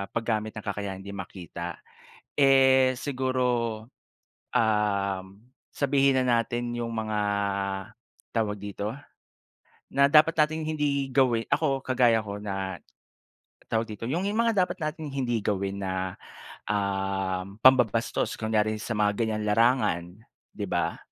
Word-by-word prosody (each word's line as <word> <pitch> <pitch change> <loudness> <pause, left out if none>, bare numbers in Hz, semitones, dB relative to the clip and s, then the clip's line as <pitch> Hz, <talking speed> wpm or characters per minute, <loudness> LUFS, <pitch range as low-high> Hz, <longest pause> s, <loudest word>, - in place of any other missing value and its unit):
paggamit 110 -2 -1
ng 105 - -6
kakayahang 100 -2 -4
hindi 100 - -7
makita, 85 -3 -7 0.6
eh 130 -1 +5
siguro, 130 -2 -1 1.1
um, 100 -3 +1 0.5
sabihin 140 -2 +3
na 120 -2 +3
natin 120 +1 -3
yung 115 -1 -3
mga, 110 -1 -2 1.2
tawag 105 -2 0
dito? 100 +2 -4 1.0
Na 140 +1 +5
dapat 155 +2 +6
nating 155 0 +1
hindi 145 -3 0
gawin 120 -4 +3
ako, 145 -3 +2
kagaya 120 -3 +4
ko 100 0 -6
na, 95 -2 -4 0.9
tawag 110 0 +1
dito? 110 +2 -6
Yung 170 +8 -1
mga 225 -3 +2
dapat 185 - -7
nating 155 -1 -4
hindi 120 -5 -1
gawin 100 -1 -2
na, 95 -1 -2 0.5
um, 95 -1 -2
pambabastos. 120 -3 +3
Kunyari 110 -1 +1
sa 115 -3 -3
mga 105 -1 +3
ganyang 110 -2 -1
larangan, 110 -5 +3 0.5
'di - - -4
ba? - - -1
115 Hz, 120 wpm, -27 LUFS, 100-135 Hz, 1.2 s, dapat